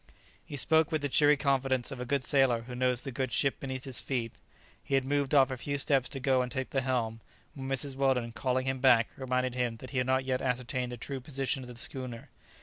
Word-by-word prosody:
He 145 - -8
spoke 160 +3 +3
with 155 -2 -1
the 145 - 0
cheery 145 +2 +5
confidence 135 -3 +1
of 130 -2 -6
a 125 - -5
good 140 0 0
sailor 130 -5 +3
who 125 +1 -9
knows 125 0 +1
the 135 - -5
good 130 0 -2
ship 140 -2 +1
beneath 130 -2 -5
his 135 -3 -1
feet. 120 -4 -2 0.5
He 135 - 0
had 135 -1 +2
moved 140 0 0
off 135 -1 +5
a 130 - -3
few 140 +3 -3
steps 135 -3 +2
to 135 - -5
go 130 0 +2
and 125 0 -3
take 130 -1 -3
the 135 - +1
helm, 120 -3 -1 0.3
when 135 -1 -6
Mrs. 135 0 0
Weldon, 130 -3 +1
calling 130 +2 -1
him 130 0 -1
back, 120 -3 +5
reminded 130 -1 -1
him 120 -2 -1
that 130 +3 -10
he 130 - 0
had 125 - 0
not 130 0 +1
yet 130 -1 0
ascertained 125 0 -2
the 120 - -6
true 135 +3 -5
position 135 +1 -2
of 125 - -9
the 120 - -9
schooner. 120 -1 -6
130 Hz, 240 wpm, -30 LUFS, 125-135 Hz, 0.5 s, cheery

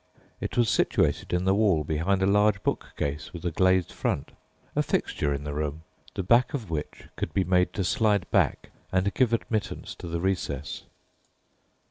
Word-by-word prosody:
It - - -4
was 120 -2 +4
situated - - +1
in 90 +1 0
the 95 - +4
wall 100 -7 +3
behind 85 +6 0
a - - +5
large 105 0 +3
bookcase 70 +1 -3
with 85 0 -8
a 85 - 0
glazed 95 +1 +3
front, - - -2 0.4
a - - +3
fixture 75 - 0
in 70 0 -2
the 75 0 -4
room, 75 +1 -3 0.3
the 95 - -2
back 120 +8 +3
of 110 -10 -5
which 75 -2 -4
could - - -4
be 95 - +3
made 90 0 +2
to 100 - -1
slide 105 -1 +2
back - - +1 0.2
and 95 +2 +1
give 125 -3 +2
admittance 110 -2 -2
to - - -8
the 85 0 -2
recess. 85 -7 -2
95 Hz, 175 wpm, -27 LUFS, 80-105 Hz, 0.4 s, a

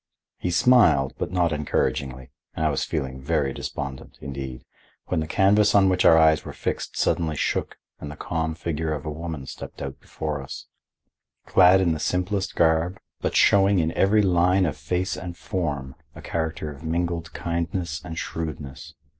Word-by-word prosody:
He 90 - -2
smiled, 90 - +4
but - - -3
not 90 -2 +2
encouragingly, 65 -3 -2 0.2
and 80 - -1
I 75 - +3
was 70 - -1
feeling 65 -1 -3
very 70 -1 0
despondent, 70 -2 -6
indeed, 65 -2 -7 0.4
when 90 - +1
the 80 - -2
canvas 100 +4 +4
on 95 -1 +6
which 90 -1 +1
our 80 - +8
eyes 80 -1 +5
were - - -8
fixed - - -4
suddenly 80 -3 +1
shook - - -1 0.2
and 75 - -7
the 75 - -8
calm 80 0 -2
figure 80 -1 -2
of 75 - -8
a 75 - -3
woman 80 -3 -6
stepped - - -9
out 70 -1 -6
before 75 -2 -4
us, 70 - -8 0.8
clad 95 +1 +6
in 85 -3 +2
the 80 - -4
simplest 90 +5 -1
garb, 80 +3 +2 0.2
but - - -2
showing 100 0 +5
in 80 -2 +1
every 105 +4 +3
line 90 0 +3
of 75 - -1
face 90 +1 -2
and 90 -1 -7
form 75 -9 -3 0.2
a - - -10
character 80 -2 -3
of 70 0 -12
mingled 85 0 -2
kindness 85 -2 -3
and 80 -2 -7
shrewdness. 75 -6 -6
80 Hz, 170 wpm, -24 LUFS, 75-90 Hz, 0.8 s, our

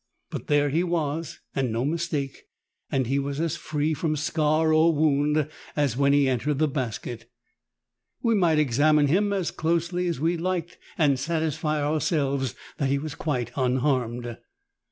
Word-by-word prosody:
But - - -6
there 145 -1 +3
he 160 +5 +1
was, 165 -3 -2
and 130 -4 0
no 115 +3 -1
mistake, 150 -3 -2 0.5
and 130 -1 +1
he 135 +4 +1
was 140 +1 -3
as 165 -2 0
free 155 +1 -1
from 155 0 -1
scar 155 +1 +1
or 160 +1 +4
wound 150 0 +2 0.3
as 145 -5 +1
when 140 +1 +3
he 140 -1 +4
entered 130 +3 0
the 155 +2 +3
basket. 120 -3 -4 0.9
We 230 - +3
might 175 -7 +3
examine 150 +2 +4
him 200 +8 +2
as 190 -4 -1
closely 170 +2 0
as 170 -6 -2
we 165 +3 +1
liked 175 0 -3 0.2
and 140 -5 +3
satisfy 155 -2 -1
ourselves 145 - 0 0.2
that 140 - 0
he 140 - +2
was 150 +1 -5
quite 130 -6 -2
unharmed. 125 -3 0
150 Hz, 155 wpm, -26 LUFS, 135-160 Hz, 0.9 s, or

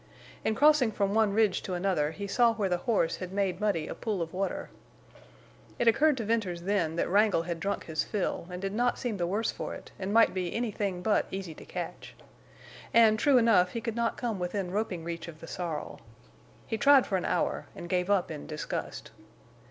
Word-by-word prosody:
In 220 - 0
crossing 285 -2 +5
from 200 -1 0
one 220 -2 +3
ridge 210 -2 +2
to 185 - -4
another 175 -5 +1
he 200 +6 -6
saw 230 +3 +3
where 205 -4 0
the 180 -1 0
horse 195 -7 +2
had 185 -1 -6
made 195 -1 -1
muddy 195 -7 0
a - - -4
pool 215 -4 -3
of 165 - -9
water. 195 +1 -3 1.1
It 240 - 0
occurred 275 +5 +4
to 230 - -2
Venters 200 -6 -1
then 180 -5 0
that 170 - 0
Wrangle 200 -3 +3
had 170 -1 -4
drunk 200 +3 -2
his 160 -1 -1
fill, 195 -4 -2
and 180 0 -6
did 195 +1 -3
not 245 +3 +1
seem 235 -5 -3
the 175 -2 -1
worse 210 +5 0
for - - -5
it, - - -12
and 190 +1 -3
might 225 +1 +5
be 180 -2 -3
anything 205 -6 -2
but 215 +1 +2
easy 190 -4 -5
to - - -13
catch. - - -7 0.8
And, 220 -2 +6
true 280 +1 +5
enough, 225 -7 +4
he 230 - -2
could 230 -1 -3
not 235 -1 0
come 230 -5 -2
within 180 +1 -2
roping 190 -4 -2
reach 170 0 -5
of 160 -2 -10
the 165 - -9
sorrel. 165 -3 -5 0.6
He 225 - -3
tried 280 -2 +6
for 195 - -2
an 180 - -3
hour, 180 - -1
and 175 - -7
gave 180 +1 0
up 195 -4 +2
in 150 -2 -7
disgust. 155 -1 -5
195 Hz, 210 wpm, -29 LUFS, 180-225 Hz, 1.1 s, And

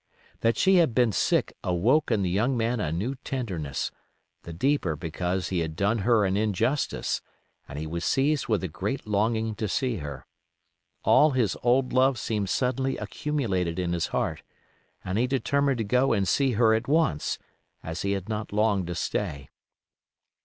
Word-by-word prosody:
That 115 0 +1
she 190 0 +4
had 160 -10 +3
been 120 -3 +4
sick - - +1
awoke 110 - +2
in 110 -4 +1
the 90 - 0
young 120 +7 +1
man 115 +1 0
a 80 -7 -1
new 100 +11 -2
tenderness, 95 - -3 0.5
the 85 - -9
deeper 90 - 0
because 90 +3 -3
he 90 - 0
had 80 -1 -3
done 100 +5 +1
her 110 0 +3
an 95 0 0
injustice; 110 +7 0 0.5
and 75 - -8
he 80 - -4
was 85 +2 -4
seized 140 - +1
with 110 -4 0
a - - -1
great 100 - -4
longing 110 +2 0
to 110 0 -3
see 125 +3 -1
her. 70 -5 -7 0.8
All 155 - +6
his 125 - +1
old 125 +2 +2
love 130 0 +4
seemed 105 -2 -2
suddenly 130 +3 0
accumulated 95 - -2
in 90 -1 -1
his 85 - 0
heart, - - -2 0.6
and 95 +3 -1
he 125 - +2
determined 140 +1 +1
to 115 - -1
go 125 +5 +2
and 100 -3 +1
see 135 +7 +2
her 110 0 +4
at 110 +2 0
once, 145 - +1 0.5
as 80 +2 -5
he 100 0 0
had 95 -1 -4
not 110 -1 -4
long 105 -3 +1
to 90 - -4
stay. 70 -4 -3
110 Hz, 175 wpm, -26 LUFS, 90-125 Hz, 0.8 s, All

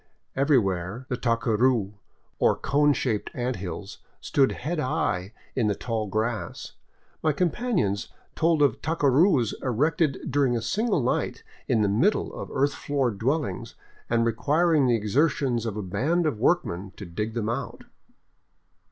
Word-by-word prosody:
Everywhere 115 - +1
the 125 - 0
tacuni, 115 -2 +1 0.5
or - - +4
cone 145 +1 +2
shaped 115 -6 -1
ant 125 0 -2
hills, 95 +2 -7 0.2
stood 135 -2 +2
head 160 +5 -3
high 95 -8 -1 0.2
in 120 -5 +1
the 105 - +1
tall 110 0 -3
grass. 110 +2 -3 0.5
My 155 - +2
companions 175 - 0 0.3
told 160 -2 +3
of 135 -6 +2
tacurus 145 - +3
erected 140 +4 0
during 135 -4 +2
a - - -3
single 200 - 0
night 125 - -1 0.2
in 110 - +2
the - - +3
middle 135 - +1
of - - -7
earth 140 +1 +1
floored 130 -8 -1
dwellings 130 -3 -2 0.3
and 115 0 +2
requiring 145 +5 +2
the 120 - +4
exertions 120 +1 +1
of 110 -1 -4
a 105 - -3
band 160 - 0
of 145 -9 -1
workmen 100 - 0
to 100 - -7
dig 105 +6 -4
them 110 -3 -1
out. 115 - -4
125 Hz, 145 wpm, -26 LUFS, 110-145 Hz, 0.5 s, or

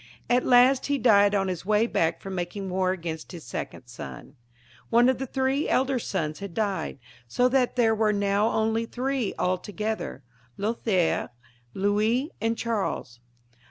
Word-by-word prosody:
At 245 +1 +3
last 255 +1 +5
he 285 0 +1
died 205 -4 +5
on 195 -1 +1
his 180 -3 -3
way 210 +3 +3
back 165 -7 0
from 195 - -6
making 185 +2 -4
war 185 0 +1
against 165 -2 -5
his 170 -3 -8
second - - -6
son. 120 +2 -9 0.6
One 240 +1 +5
of 260 - 0
the 265 - -3
three 265 +3 0
elder 265 0 +2
sons 155 -8 -3
had 200 -3 -7
died, 200 -8 -1 0.3
so 245 - +2
that 255 -1 +1
there 230 -3 +3
were 215 -1 +2
now 200 +1 +1
only 225 +1 0
three 255 -2 -2
altogether 205 -2 -2 0.2
— 120 0 -34
Loliiaire, 205 -4 0 0.5
Louis, 215 - +1
and 225 +1 0
Charles. 205 - -3
210 Hz, 160 wpm, -26 LUFS, 185-245 Hz, 0.6 s, last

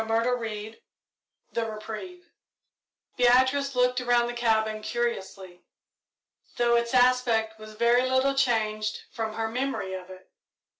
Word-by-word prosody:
CHAPTER 230 +2 +1
XXIV 220 -2 -6 0.7
THE 230 - -1
REPRIEVE 225 +12 -8 0.9
Beatrice 260 +3 +3
looked 250 0 +2
around 240 -1 +2
the 240 - -4
cabin 220 -2 0
curiously, 195 -6 -4 1.0
though 235 0 +3
its 235 +1 0
aspect 245 -3 +2
was 215 0 -11
very 240 +3 +3
little 260 +1 +2
changed 215 -5 0
from 220 -1 -4
her 225 0 -1
memory 245 -5 -3
of 185 -1 -7
it. 185 0 -14
235 Hz, 120 wpm, -26 LUFS, 215-250 Hz, 1.0 s, Beatrice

